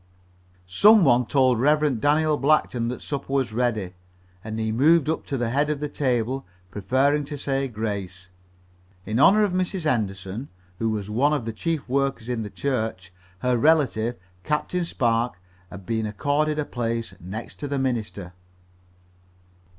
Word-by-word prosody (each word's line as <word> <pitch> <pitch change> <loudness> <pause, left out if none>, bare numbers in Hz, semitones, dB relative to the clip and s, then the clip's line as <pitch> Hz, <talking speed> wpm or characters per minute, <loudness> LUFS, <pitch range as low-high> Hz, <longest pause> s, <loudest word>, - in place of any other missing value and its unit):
Some 205 - +6
one 125 -4 +4
told 130 -4 +3
Rev. 145 -3 +2
Daniel 150 +1 +3
Blackton 135 -4 +1
that 125 +1 -5
supper 140 -2 -5
was 130 -5 0
ready, 110 -6 -1 0.5
and 110 0 -5
he 110 0 -1
moved 150 +6 +4
up 160 - -2
to 140 - -2
the 120 -2 -1
head 145 +3 +1
of 150 -2 -1
the 150 - -2
table, 130 -2 -1 0.3
prepared 135 - +1
to 145 0 -5
say 135 0 -1
grace. 100 -6 -5 0.8
In 110 +3 -1
honor 200 +8 +6
of 205 - +1
Mrs. 185 0 -1
Henderson, 105 -2 -2 0.3
who 115 - 0
was 105 -1 -3
one 140 +7 +2
of 135 -7 -1
the 115 - -4
chief 160 +6 -3
workers 135 -2 -1
in 120 -2 -1
the 105 - -5
church, 110 -8 -3 0.3
her 125 0 +2
relative, 125 -4 +2 0.3
Captain 160 +4 -1
Spark, 120 - 0 0.3
had 95 +1 -10
been 110 0 -1
accorded 145 +8 0
a 150 - -1
place 115 -2 -3
next 100 +6 -7
to 145 - -4
the 140 0 -2
minister. 110 -8 -3
125 Hz, 160 wpm, -24 LUFS, 110-145 Hz, 0.8 s, Some